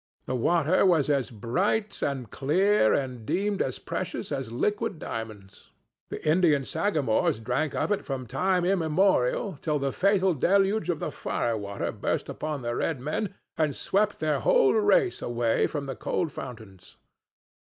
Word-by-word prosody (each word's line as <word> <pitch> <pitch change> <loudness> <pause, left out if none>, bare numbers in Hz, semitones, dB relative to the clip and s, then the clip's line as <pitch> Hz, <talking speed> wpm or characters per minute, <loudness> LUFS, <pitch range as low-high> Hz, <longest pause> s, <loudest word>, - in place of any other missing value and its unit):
The - - -3
water 165 +6 +2
was 165 -6 +3
as 135 -3 0
bright 185 - -1
and 130 -6 -2
clear 180 - +3
and 130 -4 -1
deemed 200 - -1
as 130 - -1
precious - - -5
as 135 -5 -3
liquid 210 - -1
diamonds. 110 -7 -8 0.4
The - - -6
Indian 155 -4 +3
sagamores 145 - +1
drank 125 +7 -2
of - - -1
it 205 - 0
from 135 -2 -4
time 180 +8 0
immemorial 180 -3 +1
till 150 -2 0
the 140 -1 -1
fatal 190 -1 +3
deluge 195 +8 +2
of 170 - +1
the - - -4
firewater 105 -4 -2
burst - - -2
upon 150 -4 -4
the 120 0 -2
red 155 0 -1
men 155 - -3 0.2
and 150 -3 +1
swept 210 +1 0
their 155 -1 0
whole - - +4
race 420 -2 +3
away 120 -1 +1
from 145 -2 -4
the 135 -1 -5
cold 165 -4 -2
fountains. 105 -9 -10
150 Hz, 150 wpm, -27 LUFS, 125-190 Hz, 0.4 s, whole